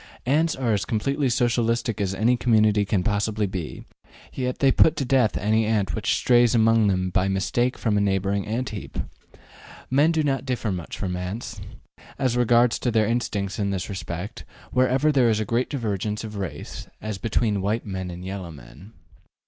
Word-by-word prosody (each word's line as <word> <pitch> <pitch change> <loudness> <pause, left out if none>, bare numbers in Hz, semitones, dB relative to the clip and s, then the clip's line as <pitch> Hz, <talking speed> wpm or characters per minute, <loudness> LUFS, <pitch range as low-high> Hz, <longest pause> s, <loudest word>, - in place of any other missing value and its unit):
Ants 155 +5 +2
are 120 -4 0
as 100 -2 0
completely 135 +8 0
Socialistic 115 -2 0
as 95 -1 -1
any 115 +5 +3
community 110 -4 +3
can 100 -2 0
possibly 105 0 0
be, 95 -5 -6 0.5
yet 125 -1 -2
they 135 -1 +4
put 160 - +4
to 135 - -2
death 125 -4 +2
any 110 +2 +2
ant 100 -6 0
which - - 0
strays 120 -1 +4
among 115 -1 +4
them 95 -1 0
by 95 +1 +1
mistake 110 +6 0
from 110 -3 0
a - - +2
neighboring 100 0 0
ant 120 +4 -2
heap. 105 -3 -7 0.9
Men 145 +5 +4
do 160 -2 +1
not 135 -3 0
differ 125 -5 -2
much 90 -3 -5
from 90 -3 -3
ants, 100 +4 -5 0.6
as 130 -3 0
regards 120 0 +3
their 115 -3 +2
instincts 105 -4 -2
in 100 -1 0
this 95 0 -3
respect, 90 +3 -6 0.3
where 130 0 +3
ever 135 +4 +2
there 130 -5 +4
is 110 -1 +1
a 110 - -1
great 120 +5 0
divergence 105 -5 -2
of 105 -1 -7
race, 95 -3 -6
as 110 -3 -5
between 110 -2 0
white 105 +4 -1
men 95 -3 -4
and 90 +1 -8
yellow 95 -2 -5
men. 75 - -13
110 Hz, 180 wpm, -24 LUFS, 100-120 Hz, 0.9 s, they